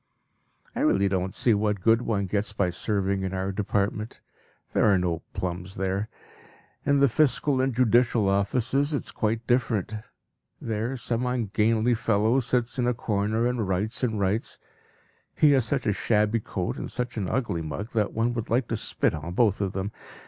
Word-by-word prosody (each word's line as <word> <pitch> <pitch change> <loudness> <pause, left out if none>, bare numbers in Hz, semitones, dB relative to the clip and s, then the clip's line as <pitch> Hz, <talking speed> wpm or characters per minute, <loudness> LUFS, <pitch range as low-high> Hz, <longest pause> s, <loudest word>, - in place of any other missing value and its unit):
I - - -3
really 100 0 +3
don't 95 0 -1
see 120 - +3
what 105 -1 0
good 115 +1 +4
one 105 -5 -1
gets 105 +2 -2
by 100 -3 0
serving 100 0 -1
in 95 0 -3
our 95 +1 -2
department. 105 +2 -2 0.5
There 105 - +4
are 95 - +4
no 85 -2 -1
plums 90 +1 -4
there. 95 +3 -2 0.7
In 140 -1 +2
the 140 - +6
fiscal 140 +1 +2
and 135 +1 +1
judicial 120 -3 +3
offices 125 +9 +1
it - - -2
is - - -7
quite 115 +1 -1
different. 115 -5 0 0.7
There 115 +4 -3
some 120 0 -2
ungainly 115 -1 +1
fellow 115 +2 +2
sits 125 0 -1
in 120 - +2
a 125 - +1
corner 110 +1 0
and 120 -4 0
writes 100 +5 -1
and 110 -4 0
writes; 100 +3 -1 0.8
he 150 - +5
has 130 -4 +3
such 130 +2 -1
a 105 - +2
shabby 105 +2 +1
coat 95 -4 -4
and - - -5
such 125 0 -3
an 100 -5 -2
ugly 110 -10 -1
mug 80 +8 -5
that 105 -3 0
one 115 +2 0
would 115 -2 -4
like 120 +2 +1
to 115 - -1
spit - - 0
on 80 +2 -5
both 105 -1 +2
of 95 -2 -1
them. 95 +2 -3
110 Hz, 180 wpm, -26 LUFS, 100-120 Hz, 0.8 s, the